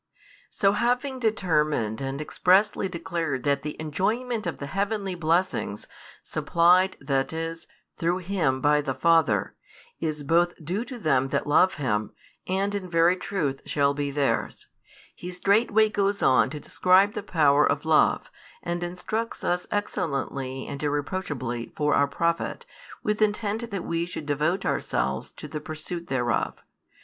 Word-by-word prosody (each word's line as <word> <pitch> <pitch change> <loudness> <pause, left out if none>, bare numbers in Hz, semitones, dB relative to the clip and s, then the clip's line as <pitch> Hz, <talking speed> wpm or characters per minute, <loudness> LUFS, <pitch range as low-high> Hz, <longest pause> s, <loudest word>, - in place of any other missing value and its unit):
So 195 - +2
having 250 +5 0
determined 155 - 0
and 135 +1 -3
expressly 190 +5 +2
declared 165 -7 -3
that 140 -1 +1
the 150 0 -6
enjoyment 215 - -1
of 170 - -3
the 140 - -6
heavenly 200 +4 -2
blessings, 170 - 0 0.4
supplied, 180 +3 +3
that 135 -2 -1
is, 165 0 -4 0.3
through 170 +2 +1
Him 160 -9 0
by 150 +1 +4
the 135 -3 -3
Father, 140 - +2 0.4
is 155 -2 -3
both 170 +4 +2
due 190 +8 -1
to 255 - -7
them 135 - +2
that - - -1
love 180 +6 +4
Him, 110 -7 -1 0.3
and 195 +2 0
in 195 -3 -4
very 170 +1 +4
truth 150 -8 -2
shall 140 -1 +2
be 145 0 -2
theirs; 140 0 -1 0.4
He 180 - -8
straightway 205 +4 +3
goes 200 -1 0
on 130 0 +4
to 150 +2 -6
describe 185 +6 +3
the - - -3
power 150 -7 +3
of 145 +2 +1
love, 160 -1 +3 0.3
and 175 0 -2
instructs 215 +6 -4
us 180 0 0
excellently 140 -9 -2
and 140 - -6
irreproachably, 145 -5 -3
for 150 -1 +1
our 140 - +4
profit, 170 - -1 0.4
with 210 0 -1
intent 215 +2 0
that 195 -5 -4
we 170 +1 -2
should 165 -4 -6
devote 150 +6 0
ourselves 65 0 -1
to - - -9
|299 - - -19
the 150 -1 -4
pursuit 165 +2 -6
thereof. 120 -4 -1
170 Hz, 150 wpm, -26 LUFS, 145-195 Hz, 0.4 s, by